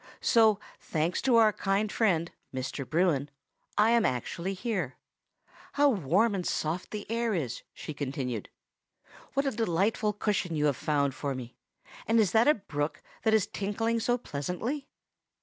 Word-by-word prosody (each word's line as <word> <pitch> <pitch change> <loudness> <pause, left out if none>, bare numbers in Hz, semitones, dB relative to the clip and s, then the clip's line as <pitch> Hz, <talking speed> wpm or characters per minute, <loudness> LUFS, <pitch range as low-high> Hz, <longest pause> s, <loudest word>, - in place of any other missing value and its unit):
So, 220 -3 +5 0.2
thanks 165 +2 -1
to 260 -3 +3
our 220 -2 +6
kind 200 +2 0
friend, 170 -7 +1 0.2
Mr. 130 0 -4
Bruin, 155 -4 +2 0.5
I 215 +2 +5
am 235 -1 +4
actually 170 - -2
here. 185 - -2 0.8
How 290 0 +5
warm 200 - +2
and 190 -2 -1
soft 165 +1 -2
the 210 -1 -5
air 230 -1 0
is!" 135 -9 -3
she 155 - -7
continued. 130 -6 -3 0.9
"What 275 +1 +2
a 275 - +1
delightful 210 0 +1
cushion 200 -5 -1
you 150 -1 +1
have 145 -3 +3
found 140 0 0
for 140 0 -3
me! 125 -1 -8 0.5
and 225 +1 +4
is 205 -6 +3
that 225 +3 +4
a 300 - +6
brook, 150 -6 -4 0.2
that 220 -1 +3
is 210 -3 +3
tinkling 225 +3 -1
so 245 +2 +1
pleasantly?" 230 - -4
195 Hz, 155 wpm, -29 LUFS, 150-225 Hz, 0.9 s, our